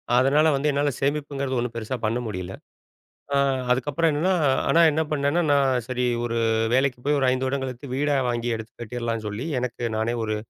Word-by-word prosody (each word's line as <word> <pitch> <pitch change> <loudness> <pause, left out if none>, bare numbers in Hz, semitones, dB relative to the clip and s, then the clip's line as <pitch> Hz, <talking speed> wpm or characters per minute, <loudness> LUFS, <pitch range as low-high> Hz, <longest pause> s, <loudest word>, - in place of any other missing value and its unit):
அதனால 135 +5 +4
வந்து, 145 +2 0
என்னால 145 +1 +1
சேமிப்புங்கிறது 140 -2 -1
ஒன்னும் 120 -1 -3
பெருசா 115 +2 -3
பண்ண 115 +3 0
முடியல. 95 -2 -5 0.8
ஆ, - - +4 0.3
அதுக்கப்புறம் 145 +6 +1
என்னன்னா, 165 +6 +1 0.4
ஆனா 165 - +4
என்ன 155 - 0
பண்ணேன்னா, 145 +3 +1
நான் 135 -3 +2
சரி 125 -1 -1 0.2
ஒரு 115 -1 -2 0.4
வேலைக்கு 130 -1 +2
போயி, 145 0 +2
ஒரு 130 - +2
ஐந்து 130 +1 0
வருடம் 130 0 -1
கழித்து, 130 +2 -6
வீடா 145 +1 +1
வாங்கி 120 0 -1
எடுத்துக் 110 +1 -10
கட்டிறலான்னு 115 -1 -3
சொல்லி, 105 +8 -4
எனக்கு 120 -1 -4
நானே 115 +2 0
ஒரு 110 -1 -1
130 Hz, 175 wpm, -24 LUFS, 120-145 Hz, 0.8 s, அதனால